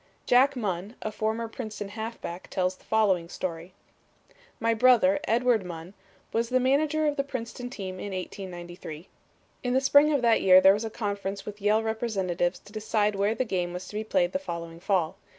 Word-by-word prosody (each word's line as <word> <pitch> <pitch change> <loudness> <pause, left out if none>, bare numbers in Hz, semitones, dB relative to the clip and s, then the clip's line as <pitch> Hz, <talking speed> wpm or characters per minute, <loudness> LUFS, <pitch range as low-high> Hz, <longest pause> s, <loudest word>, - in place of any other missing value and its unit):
Jack 265 +3 +4
Munn, 200 -2 -3
a 215 - -2
former 220 +2 -2
Princeton 215 -3 -6
halfback, 220 -4 -6
tells 185 0 0
the - - -24
following 190 -6 +2
story: 170 0 -5 0.9
"My 230 0 +2
brother, 255 +5 +5
Edward 235 -3 +2
Munn, 175 +1 -8 0.4
was 230 +1 0
the 255 0 +3
manager 295 +4 +2
of 295 0 0
the 275 - +1
Princeton 245 -2 -6
team 190 -6 -6
in 200 - -5
1893. 175 -3 -7 0.6
In 250 -1 0
the - - +5
spring 285 +3 +5
of 280 -4 +1
that 230 -1 +4
year 185 -1 +8
there 190 +1 +7
was 210 +3 -2
a - - -3
conference 200 -3 -4
with 210 0 -8
Yale 210 +2 +3
representatives 195 -6 -1
to 205 - -17
decide 215 -1 0
where 200 +2 +1
the 255 - 0
game 180 -5 -2
was 180 +1 -6
to - - -11
be 215 - -1
played 185 -4 +1
the 280 - -1
following 170 -10 -6
fall. 175 -3 0
210 Hz, 185 wpm, -27 LUFS, 185-240 Hz, 0.9 s, year